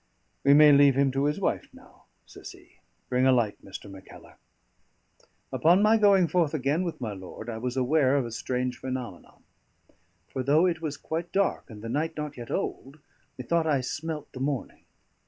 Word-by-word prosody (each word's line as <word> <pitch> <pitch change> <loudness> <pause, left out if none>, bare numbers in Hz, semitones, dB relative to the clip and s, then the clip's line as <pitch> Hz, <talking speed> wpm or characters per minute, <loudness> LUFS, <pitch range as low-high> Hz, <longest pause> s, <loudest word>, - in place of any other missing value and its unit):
"We 140 +1 +6
may 150 0 +8
leave 140 -1 +6
him 135 0 +2
to 135 +2 0
his 150 +1 0
wife - - -2
now," - - -19 0.2
says - - -11
he. - - -21 0.3
"Bring 125 +1 +2
a - - +6
light, 115 -5 0
Mr. 100 +1 -10
Mackellar." 95 -1 -14 1.2
Upon 175 +5 +4
my 220 +1 +5
going 200 -4 +4
forth 165 -3 +1
again 145 +4 0
with 170 -2 -5
my 115 -5 -4
lord, 95 +4 -8
I 110 - -6
was 125 +2 -4
aware 135 +1 +2
of 135 - 0
a 115 - -7
strange 125 +2 -3
phenomenon; 130 -2 -7 0.8
for 130 - -4
though 145 +6 +3
it 170 -3 -1
was 150 -3 -4
quite 165 +2 -5
dark, 200 0 0
and 105 -2 -11
the - - -5
night 155 +6 -2
not 150 -1 -5
yet 120 -2 -9
old, 135 +3 -4 0.4
methought 160 +6 0
I 140 -4 +2
smelt 155 +4 -5
the 130 - -9
morning. 135 0 -4
140 Hz, 185 wpm, -27 LUFS, 125-160 Hz, 1.2 s, may